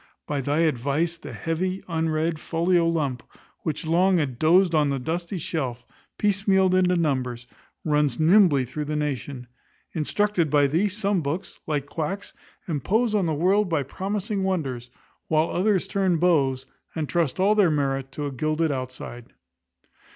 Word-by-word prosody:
By 145 -2 -2
thy 145 +4 0
advice 155 +3 0
the 145 - -9
heavy, 170 - -2
unread, 160 -1 -1
folio 170 +1 +1
lump, 145 -7 -1 0.4
which 160 +2 -3
long 180 +3 +3
had 135 -7 -2
dozed 175 +3 +4
on 150 -2 +3
the 140 - 0
dusty 170 +8 -3
shelf, 130 -7 -3 0.3
piecemealed 195 -2 +2
into 180 -1 +3
numbers, 130 -7 -1 0.4
runs 150 -5 +1
nimbly 160 -5 +5
through 150 +5 -5
the 150 +1 -3
nation. 140 -3 -3 0.5
Instructed 175 +1 0
by 145 0 +4
thee, 165 +9 +1
some 200 -2 0
books, 150 +5 -4
like 145 -3 -1
quacks, 165 +7 -4 0.3
impose 210 - 0
on 200 -5 +2
the 160 - 0
world 190 +5 +2
by 160 -4 +1
promising 195 - -3
wonders; 135 -11 -2 0.4
while 155 +1 +2
others 190 0 +1
turn 190 -3 +1
beaus, 140 -6 +2 0.3
and 155 -2 -2
trust 170 -2 0
all 200 +3 +4
their 205 -5 +4
merits 135 -3 -1
to 145 - -4
a 140 - -3
gilded 155 +4 0
outside. 130 -2 -6
160 Hz, 150 wpm, -25 LUFS, 140-185 Hz, 0.5 s, nimbly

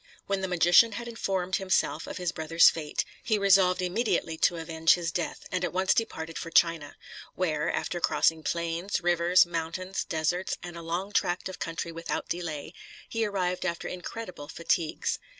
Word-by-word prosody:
When 195 -1 -1
the 190 - -1
magician 180 +5 +5
had 235 +3 -5
informed 190 -5 -1
himself 185 -4 0
of - - -6
his 180 -2 -1
brother's 165 0 +5
fate, 155 -2 -3 0.2
he 220 -3 +1
resolved 190 -2 +4
immediately 180 -3 0
to 175 - +3
avenge 165 0 +2
his 170 -2 -3
death, 170 +2 -4
and 185 -1 -1
at 175 - -1
once 190 +1 +3
departed 165 -8 -3
for 165 - -6
China; 165 -3 +2 0.4
where, 155 -5 0
after 175 - -2
crossing 160 -1 +2
plains, 170 +4 -2
rivers, 175 +1 +4
mountains, 175 +3 -3
deserts, 175 +2 -1
and 175 -1 -7
a 170 - -7
long 175 +4 -3
tract 175 -2 0
of 185 - -8
country 165 0 -4
without 165 0 -4
delay, 160 -2 -4 0.4
he 225 -1 0
arrived 180 -3 -1
after 170 -2 -2
incredible 180 -4 -7
fatigues. 165 0 -1
175 Hz, 170 wpm, -28 LUFS, 165-185 Hz, 0.4 s, magician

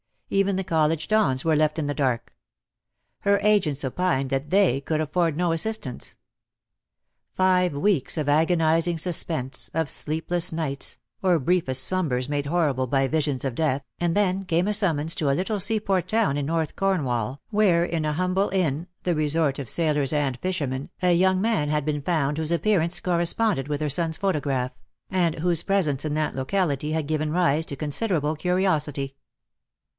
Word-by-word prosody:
Even 195 0 +2
the 190 - -1
college 160 -3 0
dons 205 -12 +2
were 160 -2 +3
left 155 0 +1
in 155 - -1
the 145 - -1
dark. 125 -5 -1 0.9
Her 200 0 +2
agents 180 -10 +2
opined 135 -1 0
that 135 +2 -2
they 185 -9 +3
could 155 +2 -1
afford 155 0 0
no 175 -1 +1
assistance. 165 - -3 1.2
Five 180 -2 +2
weeks 145 -3 0
of 150 -2 -1
agonising 165 +2 +2
suspense, 160 -5 0
of 160 -3 0
sleepless 165 +3 -1
nights, 150 -4 -2 0.2
or 185 -3 +3
briefest 135 -4 +1
slumbers 135 -6 0
made 145 -1 -1
horrible 145 -6 0
by 135 +1 +1
visions 145 -4 -1
of 135 - -1
death, 140 -1 0 0.2
and 170 -1 0
then 195 -1 +1
came 175 +2 +1
a 210 - +1
summons 165 -6 +2
to 150 - 0
a 135 - +2
little 200 +5 -1
seaport 200 -2 +1
town 220 -10 +1
in 145 -1 -2
North 160 0 -2
Cornwall, 135 - -1
where 200 -6 +3
in 165 -2 -2
a 150 - 0
humble 185 +4 0
inn, 170 -4 -1 0.2
the 180 - +1
resort 150 -2 +1
of 130 -5 -3
sailors 150 -4 +1
and 140 -4 -1
fishermen, 145 -7 -3
a 180 -1 +4
young 185 +2 +3
man 215 -9 +1
had 150 -1 0
been 150 -1 -1
found 150 -2 0
whose 160 +1 -1
appearance 170 -2 +1
corresponded 175 - +1
with 150 0 -3
her 150 - 0
son's 160 +2 +1
photograph, 140 -10 -1 0.4
and 175 -4 +1
whose 170 0 +1
presence 160 -8 0
in 150 -1 -2
that 155 -1 -1
locality 150 +1 -1
had 160 -2 -1
given 155 0 -1
rise 160 -2 +2
to 140 - -5
con 150 +2 -4
.siderable 155 -3 0
curiosity. 155 -5 0
160 Hz, 170 wpm, -24 LUFS, 145-180 Hz, 1.2 s, a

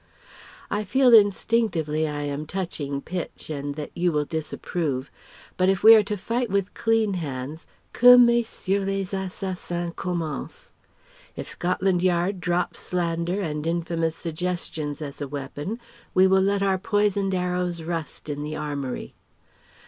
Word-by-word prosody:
I 210 +1 0
feel 250 +4 +4
instinctively 200 -7 +3
I 145 -1 -3
am 145 +1 -4
touching 155 -7 -3
pitch 175 -2 -6
and 145 -1 -4
that 150 -1 -6
you 175 0 +1
will 150 -1 0
disapprove... 155 -3 -3 0.5
but 185 0 +3
if 195 -2 +1
we 225 - +11
are 220 - +8
to 210 0 -3
fight 235 +5 -2
with 200 -1 0
clean 225 -3 +1
hands, 145 -2 -5 0.3
que 245 +1 +9
Messieurs 235 -5 +3
les 195 -1 -2
Assassins 185 -2 -4
commencent! 180 - -4 0.6
If - - -6
Scotland 180 0 0
Yards 180 +1 +1
drops 175 +1 -1
slander 170 +1 -1
and 150 -3 -3
infamous 165 -1 -1
suggestions 160 -3 -4
as 140 0 -8
a 145 - -2
weapon 145 - -5 0.4
we 185 - +6
will 190 0 +4
let 200 +1 +1
our 190 -1 +2
poisoned 200 -1 +1
arrows 180 -2 -1
rust 165 -2 -5
in 145 -1 -4
the 150 +1 -4
armoury. 140 -4 -4
180 Hz, 140 wpm, -25 LUFS, 155-195 Hz, 0.6 s, we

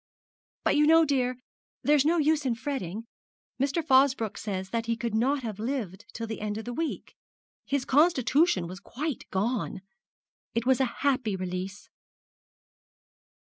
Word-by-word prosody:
But - - +3
you 300 0 +4
know, 325 +1 +7
dear, 255 -3 0 0.5
there's 290 -1 +4
no 335 +3 +3
use 310 -1 +2
in 250 -4 0
fretting. 230 -5 -4 0.6
Mr. 285 +4 +1
Fosbroke 260 -5 +3
says 190 -2 -4
that 230 0 -2
he 230 0 0
could 235 -2 -3
not 260 +5 +1
have 215 -3 -5
lived 225 -6 -3
till 230 - -5
the 220 -1 -6
end 210 0 -2
of 220 - -6
the 245 - -4
week. 325 +3 -4 0.5
His 280 -2 0
constitution 290 - +3
was 180 +2 -7
quite 280 +5 -5
gone. 210 0 -1 0.7
It 230 0 0
was 260 0 +3
a - - +4 0.2
happy 255 -7 +2
release.' 185 +2 -5
245 Hz, 150 wpm, -28 LUFS, 210-285 Hz, 0.7 s, know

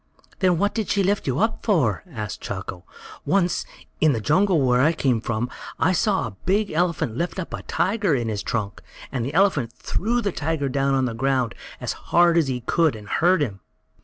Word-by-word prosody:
"Then 185 -3 +3
what 205 +4 +1
did 220 -3 -2
she 200 - +2
lift 200 -2 0
you 130 0 0
up 220 +3 0
for?" 150 - +1
asked 110 - -6
Chako. 95 -2 -6 0.4
"Once, 180 -3 +1 0.3
in 155 -2 +4
the 115 - -1
jungle 170 - +3
where 125 -2 +3
I 155 +5 +4
came 130 -8 +1
from, 115 +1 -2 0.3
I - - +3
saw - - +1
a 95 - -8
big 200 +2 +2
elephant 165 -8 0
lift 170 +8 -2
up 185 - -5
a - - -4
tiger 200 -5 0
in 120 -3 -1
his 105 -2 -2
trunk, 105 -2 -3 0.3
and 130 -4 -2
the 140 +5 -4
elephant 165 - +3
threw 225 - -1
the 205 -4 -1
tiger 155 -3 -2
down 135 +1 +1
on 130 -1 +2
the 120 - -2
ground 130 0 0 0.3
as - - -3
hard 175 -1 +3
as 165 -4 +3
he 125 -2 -2
could, 160 +3 +2
and 105 -1 -10
hurt 175 - +3
him." 100 -8 -4
145 Hz, 205 wpm, -23 LUFS, 120-180 Hz, 0.4 s, in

